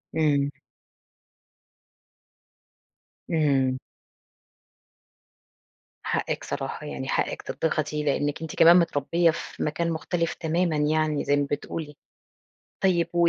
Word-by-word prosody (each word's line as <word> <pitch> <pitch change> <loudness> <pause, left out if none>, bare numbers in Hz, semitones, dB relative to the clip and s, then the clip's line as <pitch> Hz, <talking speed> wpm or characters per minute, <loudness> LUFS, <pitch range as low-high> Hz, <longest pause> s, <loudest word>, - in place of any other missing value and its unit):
إمم. 145 -3 +2 2.8
إمم. 135 -5 +2 2.3
حقِّك - - -1
صراحة، - - -4
يعني - - -5
حقِّك - - -1
تتضغطي 150 -1 -1
لإنِّك 145 +1 0
أنت 160 -2 -6
كمان 170 +2 +8
متربية 165 +1 +2
في 170 - -6
مكان 165 +2 -1
مختلف 165 +1 -1
تمامًا 165 0 0
يعني 155 0 +1
زي 145 - +3
ما 145 0 0
بتقولي، 150 +1 -4 0.9
طيب 175 -3 +3
و 170 0 +4
155 Hz, 95 wpm, -26 LUFS, 145-170 Hz, 2.8 s, كمان